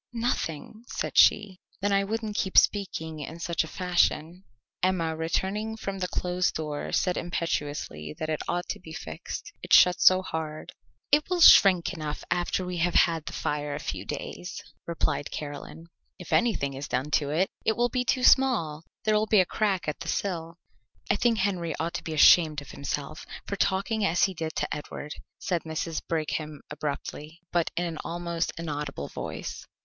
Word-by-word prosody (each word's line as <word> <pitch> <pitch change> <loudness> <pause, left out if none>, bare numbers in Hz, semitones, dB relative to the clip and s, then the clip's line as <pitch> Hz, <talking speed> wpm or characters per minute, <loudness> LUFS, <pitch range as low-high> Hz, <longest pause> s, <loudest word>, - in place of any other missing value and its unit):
"Nothing," 230 - -3
said - - -4
she. 195 -3 +5 0.2
"Then 205 +1 0
I 195 0 +3
wouldn't 220 0 -3
keep 190 -2 0
speaking 160 -6 +2
in 160 +3 -7
such 170 0 0
a - - -8
fashion." 180 0 0 0.4
Emma, 170 -3 +1
returning 195 +7 -2
from 195 -3 -4
the 180 - -1
closed 180 0 -1
door, 150 -2 -4
said 180 -2 +1
imperiously 145 - -3
that 155 - -3
it 155 -1 -2
ought 175 0 -1
to - - -3
be 160 -3 -11
fixed, 80 - -7
it - - -10
shut 180 -1 +7
so 185 0 +7
hard. 155 -3 -5 0.4
"It 300 +3 +4
will 360 -1 0
shrink 190 - +7
enough 155 -1 -5
after 175 +1 0
we 180 -1 -4
have 175 +1 +1
had 165 -2 +3
the - - -5
fire 145 -1 -2
a - - -4
few 95 -9 -4
days," 180 - -6 0.3
replied 155 -3 -1
Caroline. 150 +2 -7 0.3
"If 180 - -7
anything 210 -13 +2
is 135 +2 -6
done 130 +4 -2
to 145 -2 +2
it 170 +6 +1
it 220 - +1
will 240 +1 +2
be 250 +1 0
too 255 0 0
small; 215 - +4 0.2
there 215 - +2
will 215 +1 +2
be 215 -1 +5
a 185 - +5
crack 195 -3 0
at 150 - -2
the 165 - -7
sill." 165 -4 -2 0.5
"I - - +3
think 230 +1 +2
Henry 185 -5 -1
ought 165 +1 -2
to - - -4
be 160 - -4
ashamed 155 -1 +6
of 140 - -11
himself 145 +2 -5 0.2
for 200 - -3
talking 200 +3 0
as 175 -3 +2
he 195 -1 +3
did 160 -2 -5
to - - -1
Edward," 150 0 -7 0.2
said 175 -3 -1
Mrs. 160 0 -3
Brigham 155 -2 -2
abruptly, 150 +2 -5
but 170 -2 +1
in 175 - +1
an 165 -3 -4
almost 170 0 -2
inaudible 150 - -4
voice. - - -6
170 Hz, 180 wpm, -27 LUFS, 155-195 Hz, 0.5 s, shut